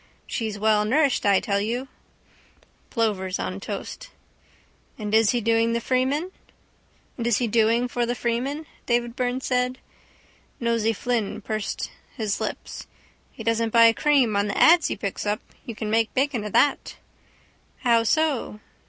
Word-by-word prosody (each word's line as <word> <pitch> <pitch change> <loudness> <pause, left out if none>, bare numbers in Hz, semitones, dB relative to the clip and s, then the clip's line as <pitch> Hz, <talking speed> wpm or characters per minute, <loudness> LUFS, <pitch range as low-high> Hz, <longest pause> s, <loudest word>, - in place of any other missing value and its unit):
She's 220 -4 -3
well 215 0 +3
nourished, 270 +2 +2
I 200 -1 +5
tell 200 -1 -1
you. 240 +5 -2 1.0
Plovers 200 -5 -1
on 185 +1 -4
toast. 210 - -7 0.9
—And 210 -1 -5
is 220 -1 +5
he 245 - +1
doing 230 +1 +2
for 265 +9 0 1.8
the 245 - -1
Freeman? 250 +6 -2 0.3
Davy 240 0 +2
Byrne 250 +1 -2
said. 250 0 0 0.8
Nosey 230 -2 +1
Flynn 230 -1 -2
pursed 215 0 -4 0.3
his 215 -4 -2
lips. - - -5 0.4
—He 225 - -9
doesn't 230 0 +1
buy 230 0 +6
cream 270 -6 +2
on 200 +1 +1
the 200 - -3
ads 335 0 +6
he - - -2
picks 200 0 -4
up. 210 +1 0 0.3
You 230 - -5
can 215 0 -4
make 225 0 +2
bacon 265 -4 0
of 210 - -6
that. 290 - +2 0.9
—How 235 -3 +4
so? 275 -3 0
230 Hz, 135 wpm, -24 LUFS, 215-255 Hz, 1.8 s, buy